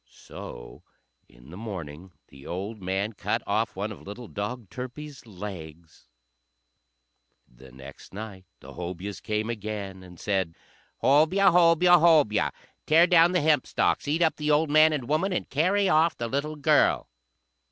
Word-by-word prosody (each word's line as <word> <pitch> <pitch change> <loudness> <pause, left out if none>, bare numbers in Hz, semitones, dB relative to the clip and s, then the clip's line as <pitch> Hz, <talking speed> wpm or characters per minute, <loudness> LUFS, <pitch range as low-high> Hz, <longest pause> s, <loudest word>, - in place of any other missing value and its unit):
So - - -11 0.5
in - - -17
the 90 - -9
morning 90 -5 -8 0.2
the 70 0 -14
old 100 +5 -5
man 95 +4 -2
cut - - -2
off - - -1
one - - -3
of - - -10
little 110 +4 -9
dog 105 +1 -6
Turpie's 130 +2 -8
legs. 85 -6 -10 1.4
The 65 +1 -17
next 65 +2 -13
night 100 -2 -9 0.2
the - - -12
Hobyahs 90 +3 -6
came 110 0 -2
again, 105 -4 -5
and 90 -2 -14
said, 95 -5 -1 0.5
"Hobyah! 160 +9 +4
Hobyah! 175 0 +5
Hobyah! 155 -10 +4 0.4
Tear 165 +3 +6
down 175 0 +5
the 180 - +2
hempstalks, 150 -1 +1
eat 160 +4 +1
up 160 - +1
the 150 0 -2
old 150 0 +2
man 155 +1 +6
and 140 -6 -3
woman, 155 +7 0
and 180 - -2
carry 190 +7 +2
off 165 -1 +3
the 120 - -3
little 140 +5 -3
girl!" 150 0 +2
115 Hz, 150 wpm, -26 LUFS, 95-155 Hz, 1.4 s, Tear